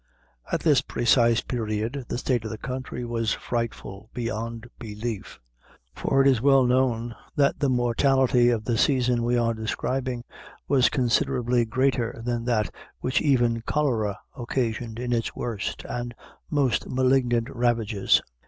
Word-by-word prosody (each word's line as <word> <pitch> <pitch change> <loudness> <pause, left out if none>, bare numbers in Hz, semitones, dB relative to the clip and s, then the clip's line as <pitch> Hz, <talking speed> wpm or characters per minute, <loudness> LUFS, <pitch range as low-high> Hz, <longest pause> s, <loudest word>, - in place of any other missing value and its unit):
At - - 0
this - - +4
precise 120 -1 +3
period, 115 +2 -3
the - - -3
state 120 -2 0
of 110 - -4
the 110 - -5
country 125 -1 -5
was 115 -2 0
frightful 110 -3 -4
beyond 115 0 -4
belief; 110 -1 -6 0.5
for 135 0 +2
it - - +4
is 130 -5 +3
well 135 0 +5
known 125 -2 +1 0.2
that 140 -2 +2
the 140 - +2
mortality 125 0 +3
of 115 -3 0
the 115 -2 0
season 125 -3 +2
we 120 +1 +1
are 115 -1 +2
describing 120 +3 -2 0.4
was 130 -5 +4
considerably 125 -2 +1
greater 125 -1 0
than 120 -1 -1
that 115 -4 0 0.3
which 130 +1 +1
even 120 -5 +2
cholera 115 -8 0 0.2
occasioned 120 -3 -2
in 120 0 -2
its 115 -1 -1
worst 110 -5 -4
and 120 -1 -4 0.3
most 140 -5 +1
malignant 125 -2 +2
ravages. 115 -5 +2
120 Hz, 140 wpm, -25 LUFS, 115-130 Hz, 0.5 s, well